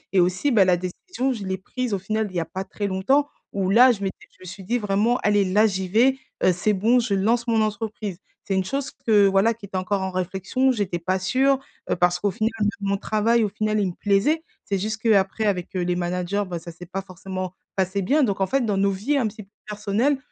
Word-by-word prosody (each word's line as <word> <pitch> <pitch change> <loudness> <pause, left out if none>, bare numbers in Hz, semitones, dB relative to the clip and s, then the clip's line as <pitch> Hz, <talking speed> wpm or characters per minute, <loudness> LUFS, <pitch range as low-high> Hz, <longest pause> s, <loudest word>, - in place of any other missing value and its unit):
et - - +6
aussi 180 +10 +2
bah 215 -5 +6
la 180 -1 +3
décision 255 - -3
je 215 -5 -6
l'ai 190 0 -2
prise 250 +5 -4
au - - +2
final 215 +3 -2
il 185 - -13
y - - +1
a 165 - -2
pas 185 +4 -5
très 205 +1 -5
longtemps 210 +10 +2 0.2
où 195 -1 -1
là 245 +4 +7
je 200 -3 -4
m'étais 190 - -5
je - - -28
me - - -11
suis 185 +2 -9
dit 235 +6 0
vraiment: 215 +3 +1
«Allez 205 -1 +3
là 200 +4 +3
j'y 190 -3 -1
vais, 250 +7 +3 0.3
heu, 185 - +5
c'est 205 +4 +1
bon 225 +6 +3
je 220 -4 0
lance 230 +5 +1
mon 225 -1 +2
entreprise». 215 -3 -3 0.3
C'est 195 - -1
une 190 - +1
chose 270 +5 -3
que, 210 -3 +3
voilà, 195 +4 +3
qui 225 -2 -12
était 190 - -4
encore 190 +2 -1
en 190 0 -2
réflexion, 190 +8 0
j'étais 195 -6 -2
pas 185 +3 0
sûre, 265 +8 +2 0.3
heu, - - +2
parce 180 0 +2
qu'au 205 - +1
final, 215 +4 -1
même 205 - +2
mon 200 0 0
travail 220 +3 +1
au - - 0
final, 215 +1 -1
il 195 - +1
me 175 - -4
plaisait. 215 +11 +1 0.2
C'est 200 - -1
juste 215 +3 -2
qu'après 215 -1 +2
avec 185 -4 0
les 180 -1 0
managers, 180 +3 -1
bah, 175 -3 -5
ça 170 0 -10
s'est 180 +2 -11
pas 190 +3 -4
forcément 185 -1 -6 0.2
passé 190 +1 0
bien 285 +10 +2
donc 200 -5 0
en 190 - +2
fait 270 +4 +1
dans 205 -3 0
nos 195 0 +2
vies 235 +10 -1
un 245 - +1
petit 215 0 -8
peu 195 - -26 0.2
personnelles, 210 +7 0
200 Hz, 250 wpm, -23 LUFS, 185-225 Hz, 0.3 s, là